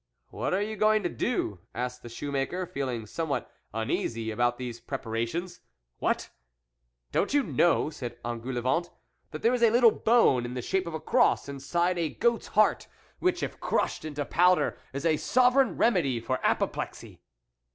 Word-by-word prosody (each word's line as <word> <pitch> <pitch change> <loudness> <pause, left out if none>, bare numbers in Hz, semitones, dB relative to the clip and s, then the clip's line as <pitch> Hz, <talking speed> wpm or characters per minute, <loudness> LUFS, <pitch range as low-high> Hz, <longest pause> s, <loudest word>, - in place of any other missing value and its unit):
" - - -51
What 115 +5 -3
are 195 - 0
you 215 +1 -4
going 215 +1 +3
to 175 - 0
do? 140 - -2
" - - -36
asked 125 +1 -3
the 120 - -9
shoe 140 +5 -5
maker, 140 +7 -1
feeling 130 -9 -3
somewhat 160 +6 -3 0.2
uneasy 110 +1 -2
about 120 +2 +1
these 120 -2 -6
preparations., 135 +8 -4 0.2
" - - -51
What! - - -1 0.8
don't 205 - +1
you 290 - +4
know," 170 -8 +2
said 120 -5 -7
En 120 -1 -3
goulevent, 130 +7 -1 0.2
" - - -46
that 155 - -8
there 235 - +4
is 250 - 0
a 230 - +6
little 235 0 +6
bone 220 - +3
in 120 +1 -5
the 125 - -2
shape 190 +4 -1
of 165 - -4
a - - -3
cross 245 - +2
inside 170 +6 -1
a 165 -2 0
goat's 235 +6 0
heart, 215 0 +2 0.3
which, 365 - +1
if - - -4
crushed - - -1
into 145 -2 -4
powder, 180 +4 +3 0.2
is 140 +4 -5
a 160 -2 +3
sovereign 255 - +3
remedy 165 - +2
for 130 +3 -2
apoplexy - - -2
155 Hz, 185 wpm, -28 LUFS, 120-200 Hz, 0.8 s, a